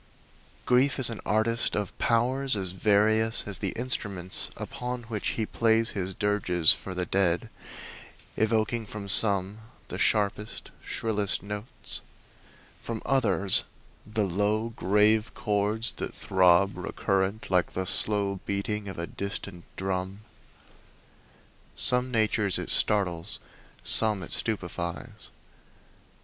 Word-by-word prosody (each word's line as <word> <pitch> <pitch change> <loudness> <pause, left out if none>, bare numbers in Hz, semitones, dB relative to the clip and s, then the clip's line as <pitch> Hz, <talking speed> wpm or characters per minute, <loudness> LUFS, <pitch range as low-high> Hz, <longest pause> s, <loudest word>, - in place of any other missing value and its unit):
Grief 130 +3 +2
is 125 -3 +5
an 115 - -5
artist 115 +2 +1
of 105 -2 -3
powers 130 +3 +1
as 95 -3 -4
various 110 +3 +2
as 100 - -1
the 100 - -2
instruments 100 -7 -1
upon 125 0 -5
which 110 -2 -4
he 110 - 0
plays 115 +1 +1
his 95 -2 -4
dirges 90 -6 +3
for 90 +3 -8
the 90 0 -2
dead, 90 -3 0 0.8
evoking 110 0 0
from 100 -1 -8
some 100 0 +6 0.3
the - - -5
sharpest, 105 +1 -1
shrillest 105 -5 -1
notes, 105 +3 -4 0.8
from 115 -2 -6
others 100 -8 +2 0.4
the 105 0 -2
low, 105 +4 0
grave 105 +1 +2
chords 105 +1 -1
that - - -7
throb 95 +1 +3
recurrent 95 +2 -2
like 90 -1 +1
the 95 - -3
slow 100 0 0
beating 100 +1 -3
of 95 - -8
a 85 - -3
distant 100 -2 -6
drum. 95 +1 -4 1.5
Some 125 +1 +5
natures 110 -4 +1
it - - -2
startles; 95 -3 0 0.4
some 105 -4 +3
it - - -5
stupefies. 95 +1 -4
105 Hz, 115 wpm, -27 LUFS, 95-110 Hz, 1.5 s, some